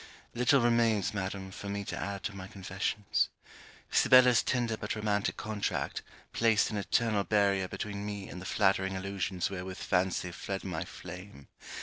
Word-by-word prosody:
Little 125 Hz, +3 st, +4 dB
remains, 115 Hz, -4 st, +3 dB
Madam, 95 Hz, -1 st, -4 dB
for 100 Hz, +1 st, -7 dB
me 100 Hz, 0 st, -3 dB
to 90 Hz, -, -4 dB
add 100 Hz, +3 st, -4 dB
to 110 Hz, -, -3 dB
my 95 Hz, -1 st, -7 dB
confessions. 95 Hz, +1 st, -1 dB, 0.6 s
Sibella's 125 Hz, -2 st, +6 dB
tender 120 Hz, -3 st, 0 dB
but 105 Hz, 0 st, -4 dB
romantic 105 Hz, -1 st, 0 dB
contract 105 Hz, -1 st, -2 dB, 0.3 s
placed 115 Hz, -2 st, +3 dB
an 105 Hz, -, -2 dB
eternal 105 Hz, 0 st, +1 dB
barrier 100 Hz, -2 st, +2 dB
between 100 Hz, +1 st, -5 dB
me 100 Hz, -1 st, -5 dB
and 90 Hz, -, -8 dB
the 95 Hz, -, -6 dB
flattering 95 Hz, 0 st, +2 dB
illusions 95 Hz, -1 st, -2 dB
wherewith 95 Hz, 0 st, -5 dB
fancy 90 Hz, -1 st, 0 dB
fled 95 Hz, +2 st, -5 dB
my 90 Hz, -3 st, -3 dB
flame. 90 Hz, -4 st, -10 dB
100 Hz, 150 wpm, -31 LUFS, 95-105 Hz, 0.6 s, Sibella's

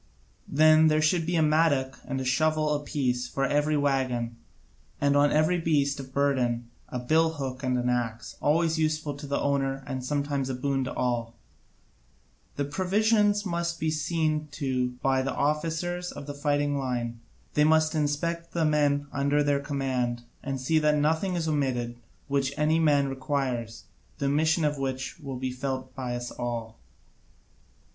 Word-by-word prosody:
Then 155 Hz, +2 st, +6 dB
there 155 Hz, 0 st, +3 dB
should 160 Hz, +1 st, +2 dB
be 175 Hz, -, 0 dB
a 160 Hz, -, +4 dB
mattock 150 Hz, -4 st, +2 dB
and 135 Hz, 0 st, -2 dB
a 130 Hz, -, -3 dB
shovel 155 Hz, +3 st, +2 dB
apiece 135 Hz, -4 st, -1 dB
for 135 Hz, +2 st, -1 dB
every 150 Hz, +2 st, +1 dB
waggon, 130 Hz, -5 st, 0 dB, 0.6 s
and 140 Hz, 0 st, +2 dB
on 145 Hz, 0 st, +4 dB
every 155 Hz, +4 st, +3 dB
beast 145 Hz, -4 st, +1 dB
of 130 Hz, -1 st, -8 dB
burden 125 Hz, -4 st, 0 dB, 0.2 s
a 125 Hz, -, -3 dB
billhook 140 Hz, -1 st, 0 dB
and 130 Hz, -2 st, 0 dB
an 125 Hz, 0 st, -1 dB
axe, 120 Hz, -2 st, -2 dB
always 160 Hz, +2 st, +2 dB
useful 155 Hz, -1 st, 0 dB
to 145 Hz, +1 st, -8 dB
the 140 Hz, -, 0 dB
owner 135 Hz, -1 st, 0 dB
and 130 Hz, -2 st, -4 dB
sometimes 140 Hz, 0 st, -1 dB
a 130 Hz, -, -2 dB
boon 135 Hz, +1 st, 0 dB
to -, -, -4 dB
all. 120 Hz, -2 st, -1 dB, 1.2 s
The 140 Hz, -, -1 dB
provisions 205 Hz, +6 st, +2 dB
must 170 Hz, -2 st, -2 dB
be 160 Hz, 0 st, 0 dB
seen 155 Hz, 0 st, 0 dB
to 130 Hz, -4 st, -1 dB
by 135 Hz, -1 st, +3 dB
the 135 Hz, 0 st, -2 dB
officers 165 Hz, +4 st, -1 dB
of -, -, -8 dB
the 145 Hz, -, -5 dB
fighting 145 Hz, 0 st, 0 dB
line; 120 Hz, -3 st, -3 dB, 0.3 s
they 150 Hz, -, +4 dB
must 155 Hz, +1 st, +4 dB
inspect 165 Hz, +3 st, -1 dB
the 165 Hz, -2 st, +1 dB
men 145 Hz, -2 st, +2 dB
under 140 Hz, +1 st, +2 dB
their 145 Hz, -1 st, +2 dB
command 130 Hz, -4 st, -2 dB, 0.2 s
and 135 Hz, -1 st, -3 dB
see 155 Hz, +5 st, +2 dB
that 150 Hz, 0 st, +3 dB
nothing 160 Hz, +5 st, +1 dB
is 165 Hz, -2 st, -1 dB
omitted 125 Hz, -5 st, -1 dB, 0.3 s
which 140 Hz, 0 st, 0 dB
any 155 Hz, +1 st, +2 dB
man 145 Hz, -3 st, +3 dB
requires; 130 Hz, -4 st, -2 dB, 0.3 s
the -, -, -2 dB
omission 155 Hz, +4 st, +2 dB, 0.2 s
would 135 Hz, +1 st, -4 dB
be 130 Hz, 0 st, -2 dB
felt 130 Hz, 0 st, -4 dB
by 125 Hz, -2 st, -4 dB
us 120 Hz, 0 st, -5 dB
all. 115 Hz, -2 st, -5 dB
145 Hz, 160 wpm, -27 LUFS, 130-155 Hz, 1.2 s, Then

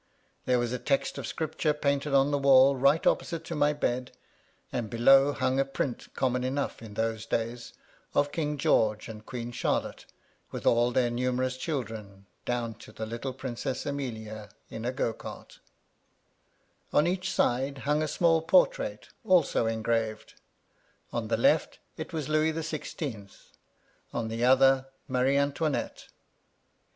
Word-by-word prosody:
There 125 Hz, -, +3 dB
was 120 Hz, -1 st, -1 dB
a 125 Hz, -, -2 dB
text 140 Hz, +1 st, 0 dB
of 125 Hz, -, -5 dB
Scripture 160 Hz, -1 st, -1 dB
painted 140 Hz, 0 st, 0 dB
on 140 Hz, +1 st, +4 dB
the 145 Hz, -, +1 dB
wall 135 Hz, 0 st, +6 dB
right 140 Hz, +4 st, +3 dB
opposite 165 Hz, -2 st, +1 dB
to 165 Hz, -, -5 dB
my 145 Hz, 0 st, +3 dB
bed; 125 Hz, -4 st, -2 dB, 0.6 s
and 115 Hz, -4 st, -3 dB
below 135 Hz, +5 st, +5 dB
hung 130 Hz, -1 st, 0 dB
a -, -, +5 dB
print, 135 Hz, -2 st, -4 dB
common 125 Hz, -1 st, 0 dB
enough 135 Hz, 0 st, -2 dB
in 110 Hz, -3 st, -10 dB
those 110 Hz, 0 st, -2 dB
days, 115 Hz, +1 st, -3 dB, 0.4 s
of 145 Hz, 0 st, +2 dB
King 150 Hz, -1 st, -2 dB
George 110 Hz, -5 st, +2 dB
and 110 Hz, -1 st, -9 dB
Queen 120 Hz, 0 st, -6 dB
Charlotte, -, -, -2 dB, 0.4 s
with -, -, -7 dB
all 120 Hz, +1 st, +4 dB
their 125 Hz, -1 st, +1 dB
numerous 125 Hz, +1 st, 0 dB
children, 110 Hz, -9 st, -5 dB, 0.2 s
down 120 Hz, -2 st, -2 dB
to 110 Hz, -, -12 dB
the 110 Hz, +1 st, -5 dB
little 115 Hz, +4 st, -4 dB
Princess 130 Hz, 0 st, -4 dB
Amelia 110 Hz, -7 st, -5 dB, 0.2 s
in 110 Hz, +1 st, -6 dB
a 125 Hz, -, 0 dB
go 120 Hz, -3 st, -1 dB
cart -, -, -10 dB, 1.3 s
On 150 Hz, -, +4 dB
each 185 Hz, +1 st, -1 dB
side 135 Hz, +3 st, +1 dB
hung 150 Hz, +1 st, +2 dB
a 155 Hz, -, 0 dB
small 165 Hz, +1 st, +3 dB
portrait, -, -, +2 dB
also 180 Hz, -, +3 dB
engraved: 110 Hz, -1 st, -1 dB, 0.8 s
on -, -, -2 dB
the -, -, +1 dB
left, -, -, +2 dB, 0.2 s
it -, -, -7 dB
was 155 Hz, -4 st, -3 dB
Louis 155 Hz, +1 st, +2 dB
the 160 Hz, +1 st, -4 dB
Sixteenth, 130 Hz, -10 st, -6 dB, 0.6 s
on 115 Hz, -2 st, -2 dB
the 115 Hz, +1 st, -2 dB
other, 135 Hz, +1 st, +5 dB, 0.2 s
Marie 130 Hz, +1 st, +2 dB
Antoinette. 140 Hz, +1 st, -1 dB
130 Hz, 150 wpm, -28 LUFS, 115-145 Hz, 1.3 s, wall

